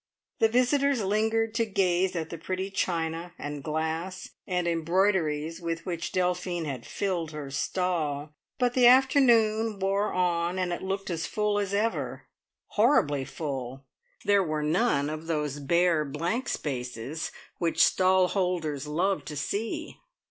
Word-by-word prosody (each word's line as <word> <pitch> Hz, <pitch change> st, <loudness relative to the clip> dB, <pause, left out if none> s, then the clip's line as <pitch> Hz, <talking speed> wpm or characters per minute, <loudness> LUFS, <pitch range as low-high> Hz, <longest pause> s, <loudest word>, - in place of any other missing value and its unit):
The 225 Hz, -, +5 dB
visitors 255 Hz, +1 st, +2 dB
lingered 220 Hz, +2 st, +1 dB
to 230 Hz, 0 st, +2 dB
gaze 185 Hz, -2 st, +1 dB
at 160 Hz, -2 st, -3 dB
the 170 Hz, -, -5 dB
pretty 185 Hz, +3 st, -3 dB
china, 170 Hz, -2 st, -2 dB
and 145 Hz, 0 st, -5 dB
glass, 160 Hz, +4 st, -3 dB, 0.2 s
and 180 Hz, -2 st, 0 dB
embroideries 165 Hz, -2 st, +1 dB
with 165 Hz, -1 st, -3 dB
which 170 Hz, -2 st, -3 dB
Delphine 180 Hz, -1 st, 0 dB
had 135 Hz, -5 st, -5 dB
filled 175 Hz, -5 st, -2 dB
her 145 Hz, -2 st, -6 dB
stall; 155 Hz, -3 st, -1 dB, 0.2 s
but 245 Hz, -2 st, +1 dB
the 250 Hz, -1 st, +6 dB
afternoon 235 Hz, -5 st, +4 dB
wore 195 Hz, +2 st, 0 dB
on, 175 Hz, 0 st, 0 dB
and 180 Hz, -1 st, 0 dB
it -, -, -4 dB
looked 195 Hz, 0 st, -3 dB
as 165 Hz, -1 st, -2 dB
full 210 Hz, -1 st, 0 dB
as 200 Hz, -1 st, -2 dB
ever 215 Hz, +3 st, -1 dB, 0.5 s
horribly 150 Hz, -, +3 dB
full! 135 Hz, -3 st, -5 dB, 0.4 s
There 200 Hz, -1 st, +4 dB
were 155 Hz, -3 st, -2 dB
none 155 Hz, -2 st, +2 dB
of 155 Hz, +1 st, -5 dB
those 150 Hz, -3 st, -1 dB
bare, 170 Hz, +2 st, +2 dB
blank 170 Hz, -, -2 dB
spaces 125 Hz, +1 st, -4 dB, 0.3 s
which 170 Hz, -2 st, +3 dB
stall 185 Hz, 0 st, +3 dB
holders 165 Hz, -7 st, -1 dB
love 180 Hz, +6 st, 0 dB
to 150 Hz, -, -6 dB
see. 200 Hz, +10 st, -3 dB
180 Hz, 140 wpm, -28 LUFS, 155-200 Hz, 0.5 s, the